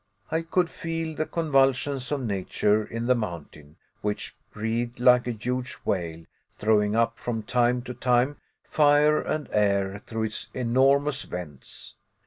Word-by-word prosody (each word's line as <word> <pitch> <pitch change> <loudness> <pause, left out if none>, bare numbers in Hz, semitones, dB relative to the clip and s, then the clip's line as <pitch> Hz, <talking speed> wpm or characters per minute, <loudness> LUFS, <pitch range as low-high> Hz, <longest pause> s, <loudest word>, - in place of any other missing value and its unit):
I 160 - +1
could 170 +2 +1
feel 165 -1 -4
the 155 - -2
convulsions 135 -4 +1
of 140 -3 -1
nature 105 0 +1
in 115 +2 -5
the 125 - +4
mountain, 85 -8 -6 0.3
which 105 0 -3 0.2
breathed 115 +3 -3
like 125 0 +5
a - - 0
huge 125 +3 -3
whale, 85 -3 -2 0.3
throwing 105 -1 +2
up 115 0 +1
from 115 -2 -3
time 120 +1 +1
to 125 - -6
time 125 +3 +1 0.3
fire 150 0 +4
and 155 -1 -3
air 100 -1 +1
through 110 -1 -2
its 110 0 -3
enormous 135 +3 +2
vents. 80 -7 -8
120 Hz, 140 wpm, -26 LUFS, 105-140 Hz, 0.3 s, like